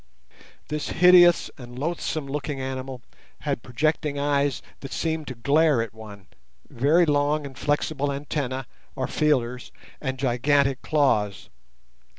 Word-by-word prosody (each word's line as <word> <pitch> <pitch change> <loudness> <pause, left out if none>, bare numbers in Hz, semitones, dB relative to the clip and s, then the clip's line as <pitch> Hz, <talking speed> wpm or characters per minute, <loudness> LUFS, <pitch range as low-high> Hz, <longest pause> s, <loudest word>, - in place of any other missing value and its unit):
This 150 0 -3
hideous 175 0 +6
and 120 -1 -10
loathsome 155 0 -2
looking 145 0 -4
animal 130 -1 -5 0.4
had - - -2
projecting 150 +3 -1
eyes 140 -1 0 0.2
that 135 - -9
seemed 160 -2 -2
to 130 - -5
glare 145 +3 +3
at 115 -2 -3
one, 105 -3 -11 0.4
very 150 +8 +3
long 145 0 +1
and 135 -1 -9
flexible 145 +1 -1
antennae 140 -2 -3 0.3
or 130 - -1
feelers, 125 -5 0 0.3
and 130 -2 -3
gigantic 135 +1 +1
claws. 110 -10 +1
140 Hz, 125 wpm, -25 LUFS, 130-150 Hz, 0.4 s, hideous